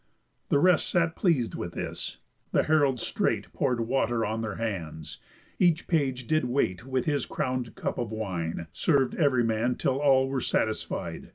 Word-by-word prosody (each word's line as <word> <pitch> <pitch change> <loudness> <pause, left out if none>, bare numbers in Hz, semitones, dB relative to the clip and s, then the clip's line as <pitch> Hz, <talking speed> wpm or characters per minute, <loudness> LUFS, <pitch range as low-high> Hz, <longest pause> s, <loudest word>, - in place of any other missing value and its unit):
The - - +4
rest 180 +2 +4
sat 165 -2 +1
pleas'd 150 - +1
with - - -5
this. - - -4 0.4
The - - +4
heralds 145 -5 +2
straight - - -1
Pour'd 120 -2 0
water 120 -1 +1
on 110 +2 -2
their 110 -3 -3
hands; 80 -9 -4 0.4
each 175 -2 +3
page 135 -7 0
did 155 +1 +1
wait 120 -4 -1
With 130 -2 -1
his 145 -2 0
crown'd 125 -2 -2
cup - - -3
of 120 -3 -3
wine, 85 -6 -3
serv'd 140 -5 +2
ev'ry 140 -6 +3
man 115 +2 +1
Till 135 0 0
all 135 -2 +4
were 135 -1 -1
satisfied. 110 -1 -2
125 Hz, 165 wpm, -28 LUFS, 110-140 Hz, 0.4 s, The